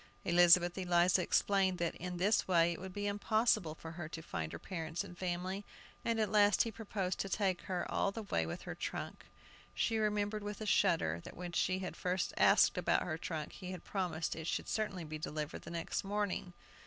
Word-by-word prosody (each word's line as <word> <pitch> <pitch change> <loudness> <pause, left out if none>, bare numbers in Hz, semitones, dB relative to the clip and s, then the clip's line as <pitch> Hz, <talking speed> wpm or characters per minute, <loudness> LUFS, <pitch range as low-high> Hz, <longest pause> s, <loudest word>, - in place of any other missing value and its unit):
Elizabeth 175 0 +6
Eliza 180 0 +3
explained 190 0 +2
that 170 -1 -1
in 180 0 -5
this 200 +5 +2
way 170 -2 +4
it 170 - -9
would 190 0 -6
be 205 +2 -4
impossible 205 -4 +1
for 165 0 -9
her 165 -1 -6
to 165 0 -7
find 80 - -4
her - - -5
parents 165 -1 -4
and 180 -3 -10
family, 185 +2 -3 0.4
and 230 -1 0
at 215 -3 +1
last 205 -2 +5
he 230 - -4
proposed 200 -4 -3
to 195 - -2
take 190 -3 0
her 180 -2 -2
all 200 - +1
the 225 +2 -6
way 85 - 0
with 80 - -5
her - - -5
trunk. - - -5 0.5
She 225 -1 +1
remembered 210 0 0
with 205 0 -5
a 215 - -4
shudder 165 - +2
that - - -10
when 175 0 -5
she 185 +2 +1
had 185 -1 -5
first 180 0 -1
asked - - +5
about - - +2
her 160 -2 -3
trunk, 155 -3 -4
he 185 - -8
had 180 - -8
promised 175 -5 -2
it 160 0 -6
should - - -1
certainly 205 -5 -2
be 155 0 -6
delivered 150 0 -4
the - - -9
next 170 -1 -3
morning. 200 -2 -2
180 Hz, 205 wpm, -35 LUFS, 170-205 Hz, 0.5 s, Elizabeth